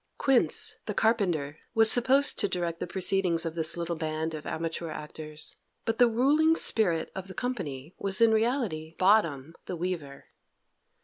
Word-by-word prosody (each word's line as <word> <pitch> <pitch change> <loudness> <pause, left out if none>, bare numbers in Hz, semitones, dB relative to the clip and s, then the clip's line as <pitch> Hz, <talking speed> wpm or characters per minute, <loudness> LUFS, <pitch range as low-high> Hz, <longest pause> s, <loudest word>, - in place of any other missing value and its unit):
Quince, 265 -3 +2
the - - -3
carpenter, 175 -10 0 0.2
was 225 0 +6
supposed 265 +4 +3
to 205 - +2
direct 170 -3 -3
the - - -4
proceedings 180 -2 0
of 165 - -3
this 165 0 -2
little 170 0 -3
band 160 0 -3
of 150 -1 -7
amateur 165 0 -4
actors, 155 0 -6 0.3
but 225 -1 -2
the 245 - +7
ruling 295 +8 +3
spirit 175 - +1
of 190 0 -7
the 190 - -10
company 165 - -4
was 195 +1 -1
in 230 -1 +5
reality 220 - -1
Bottom, 165 -7 +2
the 180 - -4
weaver. 165 -5 -5
180 Hz, 160 wpm, -28 LUFS, 160-225 Hz, 0.3 s, the